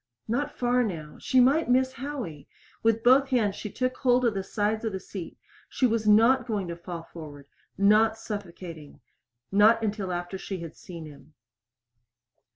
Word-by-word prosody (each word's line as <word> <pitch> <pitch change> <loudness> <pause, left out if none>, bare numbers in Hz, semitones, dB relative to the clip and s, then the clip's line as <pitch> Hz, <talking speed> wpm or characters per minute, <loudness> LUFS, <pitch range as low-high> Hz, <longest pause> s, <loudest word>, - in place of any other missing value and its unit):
Not 260 +6 -2
far 245 0 +2
now. 160 -8 -5
She 260 - +2
might 275 +4 +4
miss 260 +1 +3
Howie! 245 - -6 0.3
With 225 0 +2
both 265 +2 +5
hands 220 -6 +1
she 210 - -6
took 255 +3 -2
hold 250 -1 +3
of 230 - +2
the 195 - -2
sides 210 +3 -1
of 220 -3 -2
the 190 - -3
seat. 185 -2 -8 0.3
She 260 - +1
was 225 -2 +1
not 230 +4 +5
going 205 -5 -2
to 170 - -4
fall 170 -1 -7
forward! 150 -4 -11 0.3
Not 215 +2 +4
suffocating. 175 -8 -8 0.5
Not 215 +3 +5
until 205 -3 -2
after 175 +2 -4
she 195 - -5
had 165 -2 -8
seen 170 -3 -9
him. 150 +1 -15
215 Hz, 165 wpm, -27 LUFS, 180-245 Hz, 0.5 s, both